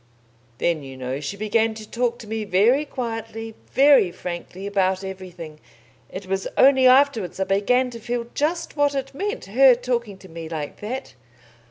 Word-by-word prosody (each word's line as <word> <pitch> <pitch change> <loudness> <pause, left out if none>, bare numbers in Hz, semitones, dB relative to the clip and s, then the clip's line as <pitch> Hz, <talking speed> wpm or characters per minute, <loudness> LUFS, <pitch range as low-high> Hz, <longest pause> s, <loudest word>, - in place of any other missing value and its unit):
Then, 170 -3 0
you 135 -1 -10
know, 130 +1 -4
she 150 +7 -5
began 220 +2 +1
to 215 -1 -9
talk 240 +1 -1
to 225 - -11
me 220 0 -3
very 215 +9 +3
quietly, 225 -4 -5 0.2
very 275 -8 +5
frankly, 180 +2 -7
about 190 -1 0
everything. 180 -5 -8 0.5
It 190 +1 -7
was 195 +1 -2
only 265 -1 +6
afterwards 255 - +3
I - - +2
began 250 +7 +1
to 230 - -8
feel 235 +1 -3
just 330 +4 -1
what 290 -1 +2
it 270 0 -3
meant, 405 +9 -4
her 255 +5 +6
talking 235 -4 -3
to 190 - -14
me 165 -1 -8
like 155 -3 -5
that." 255 +6 -5
220 Hz, 170 wpm, -23 LUFS, 185-255 Hz, 0.5 s, only